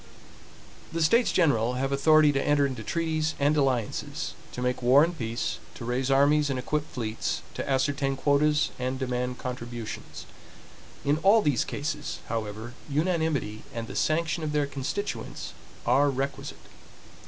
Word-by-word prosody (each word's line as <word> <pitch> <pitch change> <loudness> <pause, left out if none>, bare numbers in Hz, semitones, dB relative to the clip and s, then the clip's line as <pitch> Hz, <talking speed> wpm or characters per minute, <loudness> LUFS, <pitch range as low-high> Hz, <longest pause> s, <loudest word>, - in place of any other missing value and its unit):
The 165 0 0
States 230 +10 +4
General 125 -9 +3
have 135 +2 -1
authority 155 +2 +5
to 135 -1 0
enter 145 0 +3
into 130 -4 -3
treaties 160 +4 -1
and 145 +2 +3
alliances; 130 -7 -1 0.2
to - - -7
make 125 0 0
war 130 +4 +6
and 170 +1 0
peace; 115 -4 -3 0.2
to 120 - -7
raise 125 +2 -1
armies 145 +2 +4
and 135 - -1
equip 150 +4 -2
fleets; 115 -3 -3
to - - -4
ascertain 135 0 +1
quotas 150 +2 +2
and 130 +1 -1
demand 125 -1 -2
contributions. 120 -3 -6 0.8
In 145 +2 +2
all 205 +5 +5
these 145 -5 +2
cases, 150 +1 -4
however, 110 +1 -4 0.2
unanimity 155 - 0
and 115 -1 -3
the - - -8
sanction 160 0 0
of 150 -1 -2
their 150 -1 +2
constituents 140 +9 -4 0.3
are 135 +4 +4
requisite. 135 +1 -3
140 Hz, 145 wpm, -27 LUFS, 125-150 Hz, 0.8 s, war